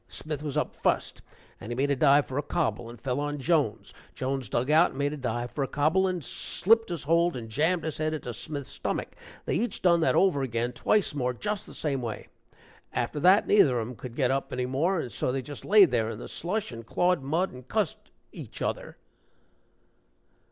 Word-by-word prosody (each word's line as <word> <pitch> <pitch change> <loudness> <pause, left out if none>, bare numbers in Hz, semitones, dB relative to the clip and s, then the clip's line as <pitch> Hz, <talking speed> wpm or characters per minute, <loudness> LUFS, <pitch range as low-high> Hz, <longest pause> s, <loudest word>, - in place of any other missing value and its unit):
Smith 150 +1 -5
was 150 -1 -3
up 150 - -1
fust, - - -1 0.4
and 110 - -8
he - - -2
made 140 +3 +1
a - - +3
dive 145 +1 +5
for 130 +2 -3
a - - +1
cobble 115 -5 -2
and 120 -1 -11
fell 125 +2 -2
on 145 0 -2
Jones; 140 -5 0 0.2
Jones 135 -1 -3
dug 125 +5 0
out 165 +3 +6
and - - -11
made 145 +1 0
a - - -5
dive 120 -2 -3
for 140 - -2
a - - -2
cobble, 160 +8 +2
and 180 -3 -2
slipped 225 +3 +2
his 170 -3 -4
hold 170 0 +2
and 115 -2 -7
jammed 160 +9 +1
his 160 -1 -3
head 155 0 0
into 145 -6 -4
Smith's 140 +4 -6
stomach. - - -3 0.4
They - - -1
each 240 +2 -1
done 170 -2 +5
that 165 - +2
over 185 -8 +3
again, 120 -1 -1
twice 205 - +1
more, 125 -3 -1
just 210 - -3
the - - -11
same 140 -4 -2
way. 115 -3 -6 0.6
After 150 - -2
that, 185 +7 +5
neither 140 - +4
of 110 - -3
'em 125 - -8
could 120 0 -9
get 130 -2 +2
up 135 0 -1
any 125 0 -1
more, 155 +9 +1
and 125 - -4
so 125 - -1
they 135 0 -2
just 145 +2 -8
laid 200 -4 +6
there 115 -3 +1
in 110 - -5
the 120 - -8
slush 195 +3 -3
and 115 -1 -8
clawed 175 +7 +1
mud 160 +8 0
and 125 0 -12
cussed 215 -8 -2 0.2
each - - -9
other." - - -3
145 Hz, 220 wpm, -28 LUFS, 125-170 Hz, 0.6 s, out